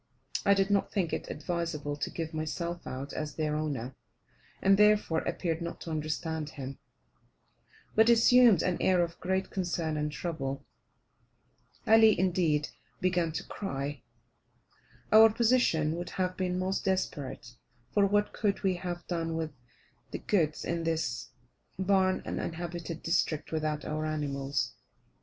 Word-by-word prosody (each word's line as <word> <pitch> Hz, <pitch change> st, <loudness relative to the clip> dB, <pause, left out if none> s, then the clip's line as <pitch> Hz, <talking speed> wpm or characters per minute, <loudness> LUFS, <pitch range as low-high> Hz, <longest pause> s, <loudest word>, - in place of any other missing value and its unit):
I 200 Hz, -, +7 dB
did 195 Hz, 0 st, +1 dB
not 200 Hz, -1 st, +2 dB
think 185 Hz, -6 st, -1 dB
it -, -, -3 dB
advisable 160 Hz, -3 st, -3 dB
to 145 Hz, -, -3 dB
give 165 Hz, -1 st, -5 dB
myself 170 Hz, +2 st, -4 dB
out 135 Hz, +2 st, -5 dB
as 150 Hz, -2 st, -4 dB
their 155 Hz, -1 st, -1 dB
owner, 140 Hz, -5 st, -3 dB, 0.7 s
and 195 Hz, +1 st, +5 dB
therefore 210 Hz, -5 st, +4 dB
appeared 170 Hz, -1 st, -2 dB
not 170 Hz, 0 st, -5 dB
to 165 Hz, -, -6 dB
understand 155 Hz, 0 st, -2 dB
him, 135 Hz, -2 st, -7 dB, 1.1 s
but 220 Hz, +2 st, +5 dB
assumed 235 Hz, -4 st, +6 dB
an 180 Hz, -1 st, 0 dB
air 180 Hz, -2 st, +4 dB
of 170 Hz, -1 st, -5 dB
great 190 Hz, +1 st, -1 dB
concern 170 Hz, -4 st, -1 dB
and 150 Hz, 0 st, -1 dB
trouble. 140 Hz, -4 st, -4 dB, 1.2 s
Ali, 220 Hz, -2 st, +6 dB
indeed, 170 Hz, -5 st, +1 dB, 0.3 s
began 175 Hz, -3 st, +1 dB
to 155 Hz, -, -4 dB
cry. 140 Hz, -, -4 dB, 1.1 s
Our 220 Hz, +1 st, +9 dB
position 220 Hz, -10 st, +2 dB
would 175 Hz, 0 st, -5 dB
have 185 Hz, -1 st, -2 dB
been 180 Hz, -1 st, -1 dB
most 185 Hz, +1 st, -1 dB
desperate; 140 Hz, -10 st, -2 dB, 0.4 s
for, 205 Hz, -1 st, +4 dB
what 205 Hz, +1 st, +1 dB
could 205 Hz, -1 st, -1 dB
we 190 Hz, -2 st, +2 dB
have 175 Hz, -1 st, -5 dB
done 165 Hz, -2 st, -2 dB
with 160 Hz, -1 st, -3 dB, 0.6 s
the -, -, -4 dB
goods 160 Hz, -7 st, 0 dB
in 170 Hz, -1 st, -1 dB
this 160 Hz, -7 st, -2 dB, 0.5 s
barren 190 Hz, 0 st, +2 dB
uninhabited 170 Hz, 0 st, -4 dB
district 165 Hz, -2 st, 0 dB
without 155 Hz, -1 st, -2 dB
our 155 Hz, 0 st, -2 dB
animals. 140 Hz, -4 st, -2 dB
170 Hz, 140 wpm, -30 LUFS, 155-190 Hz, 1.2 s, Our